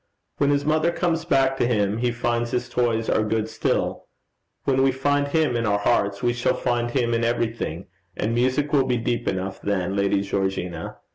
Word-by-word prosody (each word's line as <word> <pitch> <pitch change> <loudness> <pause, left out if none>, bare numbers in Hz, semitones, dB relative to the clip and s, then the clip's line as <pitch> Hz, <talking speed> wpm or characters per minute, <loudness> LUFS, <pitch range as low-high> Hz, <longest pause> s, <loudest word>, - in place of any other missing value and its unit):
When 140 - +3
his 145 0 +1
mother 155 +2 +2
comes 170 -2 -1
back 135 -5 +2
to 120 - +2
him 105 -2 +1
he 125 0 +1
finds 120 0 -1
his 125 +1 -2
toys 115 -2 0
are - - +2
good 110 0 -1
still. - - -1 0.6
When 135 -1 +2
we 135 0 +4
find 145 +2 +1
Him 150 -4 +1
in 115 -1 0
our 100 0 +2
own - - -5
hearts, 100 -3 +1
we 120 0 +2
shall 120 0 0
find 120 -1 -1
him 120 -2 0
in 115 0 +1
everything, 115 -7 -2 0.3
and 110 +2 -1
music 130 +5 +1
will 135 -3 +4
be 125 - +1
deep 120 +1 -2
enough 95 +1 -3
then, 95 -1 -1
Lady 100 0 +2
Georgina. 95 -4 -3
120 Hz, 200 wpm, -24 LUFS, 105-135 Hz, 0.6 s, we